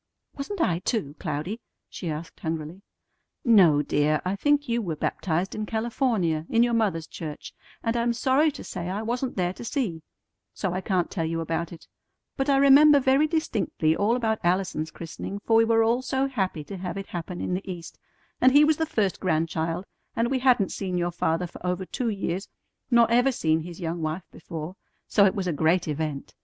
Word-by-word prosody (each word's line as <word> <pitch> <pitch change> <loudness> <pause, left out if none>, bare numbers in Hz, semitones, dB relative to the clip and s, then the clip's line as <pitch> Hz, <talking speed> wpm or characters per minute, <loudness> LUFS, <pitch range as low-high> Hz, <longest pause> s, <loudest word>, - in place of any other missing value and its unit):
"Wasn't 295 +8 -5
I, 170 - +2
too, 180 - -2
Cloudy?" 165 +8 -4 0.3
she 175 - -6
asked 160 +2 -6
hungrily. 160 +3 -4 0.6
"No, 180 - +6
dear, 150 +1 +1
I 185 +2 0
think 290 +6 +2
you 235 0 0
were 170 -7 -3
baptized 175 +4 -1
in 215 0 -4
California 220 - 0
in 230 0 +4
your 240 0 +1
mother's 200 -8 +1
church, 155 -2 -8 0.3
and 230 0 0
I'm 235 0 +1
sorry 265 +6 +3
to 275 - -8
say 175 -1 -5
I 200 +4 -3
wasn't 245 +3 -2
there 180 -1 0
to - - -9
see; 225 - -2 0.5
so 190 -3 -2
I 185 - -2
can't 185 -3 0
tell 165 -4 -1
you 165 +1 -2
about 165 0 -2
it; 170 - -11 0.5
but 270 +1 -1
I 275 - +4
remember 280 +2 +7
very 270 +3 +3
distinctly 225 - 0
all 215 +6 +2
about 220 -3 0
Allison's 175 -3 0
christening, 170 +4 -7
for 225 - +3
we 225 0 +6
were 225 0 +4
all 235 +3 +2
so 265 +1 0
happy 190 - -2
to 195 +6 -8
have 180 +1 -5
it 195 - -4
happen 175 +1 -5
in - - -2
the 190 +1 -3
East, 170 -2 -9 0.4
and 255 0 +6
he 290 +1 +8
was 305 0 +3
the 320 - 0
first 205 - 0
grandchild, 165 0 -1 0.3
and 235 +2 0
we 265 - +1
hadn't 250 -6 +3
seen 185 -2 -3
your 175 0 0
father 165 0 0
for 175 - -11
over 180 +1 -1
two 240 +5 -2
years, 195 -2 -3 0.4
nor 235 -2 +6
ever 245 +3 +4
seen 160 -9 +1
his 170 +2 -8
young 170 -1 -3
wife 160 +3 -3
before; 160 +2 -7 0.3
so 200 -2 +5
it 190 - 0
was 195 -2 -2
a 175 - 0
great 165 +4 +2
event. 150 -2 -3
190 Hz, 200 wpm, -26 LUFS, 165-235 Hz, 0.6 s, he